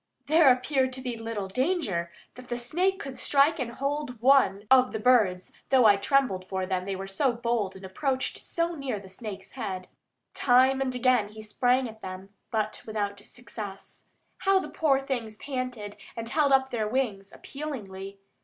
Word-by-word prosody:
There 310 -2 +6
appeared 260 +1 +1
to 260 - -3
be 250 -2 -3
little 225 -3 -4
danger 210 - -1 0.2
that 255 0 -12
the 240 - -3
snake 355 +11 0
could 270 -2 -7
strike 295 +3 +3
and 235 -2 -3
hold 275 -2 -3
one 230 -6 +4
of 255 -1 +6
the 220 - -2
birds, 210 -7 +3 0.2
though 260 -3 +5
I 205 -2 +8
trembled 200 -3 +1
for 190 0 -3
them, 185 -1 -2
they 195 0 -3
were 190 +1 -5
so 215 +7 +1
bold 230 -4 -1
and 190 0 -10
approached 260 +7 -2
so 335 0 -1
near 275 -7 -3
to 200 - -7
the 190 - -12
snake's 195 -1 -8
head. 190 -7 -5 0.4
Time 260 +1 +4
and 260 -1 -1
again 250 -4 +3
he 215 +1 -10
sprang 250 +4 +1
at 220 -1 -12
them, 185 +1 -7 0.2
but 215 -1 -2
without 205 -2 -2
success. 205 -3 -9 0.3
How 390 0 +4
the - - -6
poor 280 -4 +2
things 245 -6 -4
panted, 250 -7 -5 0.2
and 230 0 -5
held 285 +3 +2
up 265 0 +4
their 220 -3 -1
wings 210 -5 -2
appealingly! 200 -10 -7
240 Hz, 180 wpm, -27 LUFS, 200-270 Hz, 0.4 s, I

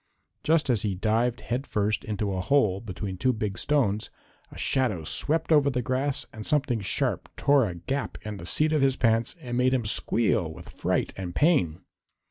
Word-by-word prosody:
Just 155 -4 +2
as 115 -5 +1
he 100 -2 -1
dived 115 +5 0
head 125 +4 -3
first 105 0 0
into 105 -2 -2
a 95 - -2
hole 105 -5 +2
between 95 -2 -5
two 130 +8 +2
big 105 -4 -3
stones, 110 -6 0 0.4
a - - -11
shadow 115 -11 0
swept 160 - 0
over 145 -2 +5
the 125 -2 -1
grass 130 +3 -1
and 110 -2 -7
something 145 -5 +1
sharp 100 - -1
tore 140 -6 +3
a 90 - -6
gap 135 +11 -3
in 105 -1 -5
the 85 - -9
seat 155 - +1
of 155 - +2
his 135 -1 +3
pants 115 +1 +1
and 120 -5 -4
made 130 +1 +3
him 120 -4 -1
squeal 105 -5 +1
with - - -11
fright - - -1
and 90 -2 -6
pain. 95 - +2
115 Hz, 190 wpm, -27 LUFS, 100-135 Hz, 0.4 s, over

